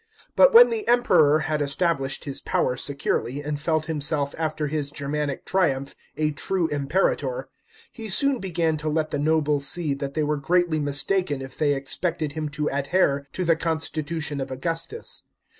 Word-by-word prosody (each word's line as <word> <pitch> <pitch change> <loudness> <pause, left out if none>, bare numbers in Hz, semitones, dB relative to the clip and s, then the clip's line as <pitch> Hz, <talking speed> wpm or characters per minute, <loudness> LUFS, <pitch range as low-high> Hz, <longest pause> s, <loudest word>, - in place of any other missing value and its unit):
But - - +7
when 470 +1 +8
the 440 -2 -2
Emperor 165 -11 +4
had 155 -1 -1
established 140 -1 -1
his 140 -2 -3
power 125 - 0
securely, 140 0 -2
and 145 0 -3
felt 155 0 0
himself 145 -2 -1
after 155 -1 -2
his 145 -1 -2
Germanic 145 0 -3
triumph 140 -8 0 0.2
a 155 0 +1
true 170 +4 -1
Imperator, 175 - -1 0.4
he 225 -2 -3
soon 275 +6 +4
began 170 -4 0
to 155 +1 -3
let 155 0 -1
the 145 - -1
nobles 150 -2 +1
see 160 -4 +1
that 140 0 -5
they 155 - +1
were 150 0 0
greatly 170 +2 +1
mistaken 145 +2 0
if 135 0 -8
they 145 -2 +1
expected 155 +3 -2
him 155 0 -4
to 150 0 -3
a<! 140 - -1
here 140 -6 +2
to 185 - -2
the 165 -1 +4
constitution 160 -2 -2
of 135 - -4
Augustus. 165 - -4
155 Hz, 170 wpm, -24 LUFS, 140-170 Hz, 0.4 s, when